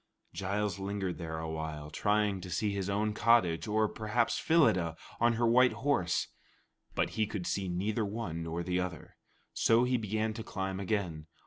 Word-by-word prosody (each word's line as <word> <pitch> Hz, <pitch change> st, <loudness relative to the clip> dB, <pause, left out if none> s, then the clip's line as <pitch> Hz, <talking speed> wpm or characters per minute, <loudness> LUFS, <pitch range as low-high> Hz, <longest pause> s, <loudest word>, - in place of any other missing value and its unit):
Giles 100 Hz, +2 st, -1 dB
lingered 95 Hz, -2 st, -3 dB
there 80 Hz, -2 st, -4 dB
a 80 Hz, 0 st, -4 dB
while, 80 Hz, -1 st, -5 dB
trying 105 Hz, +1 st, +1 dB
to 90 Hz, -, -7 dB
see 100 Hz, +4 st, 0 dB
his 100 Hz, -1 st, -2 dB
own 105 Hz, +2 st, 0 dB
cottage, 105 Hz, -8 st, +3 dB
or 110 Hz, 0 st, +2 dB
perhaps 110 Hz, +2 st, 0 dB
Phyllida 90 Hz, -, +3 dB, 0.2 s
on 120 Hz, 0 st, +4 dB
her 120 Hz, +1 st, +1 dB
white 125 Hz, +2 st, +5 dB
horse; 130 Hz, -12 st, 0 dB, 0.7 s
but -, -, +1 dB
he 110 Hz, -1 st, 0 dB
could 105 Hz, -4 st, -4 dB
see 95 Hz, 0 st, -1 dB
neither 105 Hz, +5 st, -1 dB
one 100 Hz, -6 st, -4 dB
nor 85 Hz, +1 st, -3 dB
the 90 Hz, +1 st, 0 dB
other. 90 Hz, -3 st, -5 dB, 0.4 s
So 115 Hz, +1 st, +4 dB
he 125 Hz, 0 st, +2 dB
began 110 Hz, 0 st, -1 dB
to 110 Hz, 0 st, -6 dB
climb 95 Hz, -2 st, -3 dB
again. 90 Hz, -6 st, -2 dB
100 Hz, 175 wpm, -31 LUFS, 90-110 Hz, 0.7 s, white